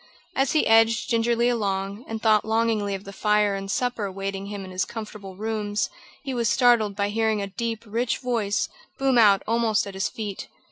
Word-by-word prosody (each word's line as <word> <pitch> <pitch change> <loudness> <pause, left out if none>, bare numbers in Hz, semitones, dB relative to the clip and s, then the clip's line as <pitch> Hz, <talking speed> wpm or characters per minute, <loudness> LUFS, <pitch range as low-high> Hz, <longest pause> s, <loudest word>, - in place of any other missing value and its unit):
As 270 0 +1
he 310 - +3
edged 225 +1 +4
gingerly 235 +1 +2
along, 200 -2 -1
and 225 0 -4
thought 215 -1 +4
longingly 220 -2 0
of 195 - -8
the 200 - -10
fire 210 0 +2
and 195 0 -5
supper 245 0 -1
awaiting 195 0 -4
him 200 -1 -6
in 185 - -10
his 185 +1 0
comfortable 210 -4 -8
rooms, 210 -2 -2 0.3
he 270 -2 -4
was 235 -3 +1
startled 235 -5 +3
by 200 0 0
hearing 220 0 +1
a 200 - -2
deep, 225 +3 -4
rich 230 +3 -1
voice 230 -6 -1 0.3
boom 265 -2 +3
out 200 -3 +5
almost 225 -1 +1
at 200 - -7
his 190 +1 -1
feet. 210 -3 -6
215 Hz, 190 wpm, -25 LUFS, 200-230 Hz, 0.3 s, out